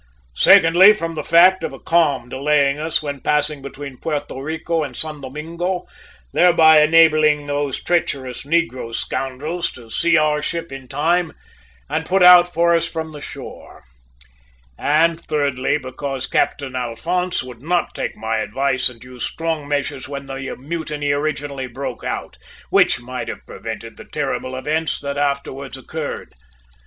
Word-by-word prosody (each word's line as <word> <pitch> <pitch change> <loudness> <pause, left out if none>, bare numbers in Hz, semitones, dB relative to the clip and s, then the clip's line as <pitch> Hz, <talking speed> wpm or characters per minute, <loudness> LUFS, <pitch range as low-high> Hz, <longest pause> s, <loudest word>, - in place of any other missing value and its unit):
Secondly, 175 - +7
from 165 -6 -4
the 155 -2 -4
fact 180 +4 +5
of - - -3
a 135 - -9
calm 145 -7 +1
delaying 140 +2 +1
us 155 0 0
when 145 -2 -4
passing 150 -1 0
between 140 -1 -8
Puerto 145 -4 -4
Rico 160 +2 -2
and 135 -5 -5
San 155 -2 -4
Domingo, 165 +7 -4 0.5
thereby 165 -3 +6
enabling 155 -2 +5
those 145 -2 -2
treacherous 135 -7 -1
negro 140 -7 -1
scoundrels 150 +7 -3
to 115 -3 -14
see 170 +5 +3
our 150 -1 +2
ship 170 +1 -4
in 135 -1 -9
time 165 +5 0 0.5
to - - -1
put 190 0 +2
out 180 0 +8
for 170 0 +3
us 165 - +1
from 160 -1 -5
the 150 -1 -10
shore; - - -10 0.9
and 160 - +2
thirdly, 145 -4 0
because 135 0 -4
Captain 135 -3 -1
Alphonse 170 +10 -1
would 125 -2 -11
not 175 +4 0
take - - -4
my 110 0 -2
advice 130 +3 0
and 120 -2 -14
use 125 -1 -8
strong 165 -3 -3
measures 145 -2 -2
when 140 -1 -6
the 135 0 -6
mutiny 150 0 -3
originally 145 -2 -2
broke 130 +3 -6
out, - - -5 0.3
which - - +4
might 125 +1 -6
have - - -7
prevented - - -8
the - - -11
terrible 130 0 -3
events 155 +5 -1
that 140 0 -4
afterwards 140 -1 -2
occurred! 150 +3 -6
145 Hz, 150 wpm, -20 LUFS, 135-165 Hz, 0.9 s, out